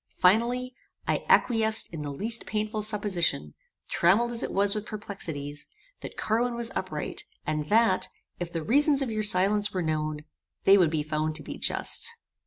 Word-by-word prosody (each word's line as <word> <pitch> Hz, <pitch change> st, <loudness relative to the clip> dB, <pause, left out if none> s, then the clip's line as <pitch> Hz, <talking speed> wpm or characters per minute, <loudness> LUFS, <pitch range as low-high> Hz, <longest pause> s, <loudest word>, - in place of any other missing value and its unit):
Finally, 240 Hz, +6 st, +2 dB, 0.3 s
I -, -, 0 dB
acquiesced 220 Hz, -5 st, +4 dB
in 160 Hz, -, -5 dB
the 145 Hz, -, -4 dB
least 220 Hz, +11 st, -3 dB
painful 215 Hz, 0 st, -2 dB
supposition, 190 Hz, -, 0 dB, 0.3 s
trammelled 210 Hz, +8 st, +3 dB
as 235 Hz, -, -1 dB
it -, -, -2 dB
was 200 Hz, 0 st, +2 dB
with 210 Hz, -1 st, -4 dB
perplexities, 160 Hz, -9 st, -6 dB, 0.3 s
that -, -, -9 dB
Carwin 235 Hz, +2 st, 0 dB
was 235 Hz, -1 st, 0 dB
upright, 155 Hz, -6 st, -4 dB, 0.2 s
and 155 Hz, -1 st, -2 dB
that, 215 Hz, -3 st, +3 dB, 0.3 s
if 175 Hz, -1 st, -4 dB
the 165 Hz, -2 st, -3 dB
reasons 285 Hz, -, +3 dB
of 250 Hz, -, -3 dB
your 215 Hz, -1 st, -1 dB
silence 205 Hz, +1 st, +3 dB
were 185 Hz, -2 st, -1 dB
known, 155 Hz, -1 st, -2 dB, 0.4 s
they 195 Hz, -, +7 dB
would 180 Hz, -5 st, +4 dB
be 155 Hz, -1 st, -1 dB
found 155 Hz, 0 st, -2 dB
to 155 Hz, -, -5 dB
be -, -, -8 dB
just." -, -, +1 dB
200 Hz, 170 wpm, -27 LUFS, 155-220 Hz, 0.4 s, they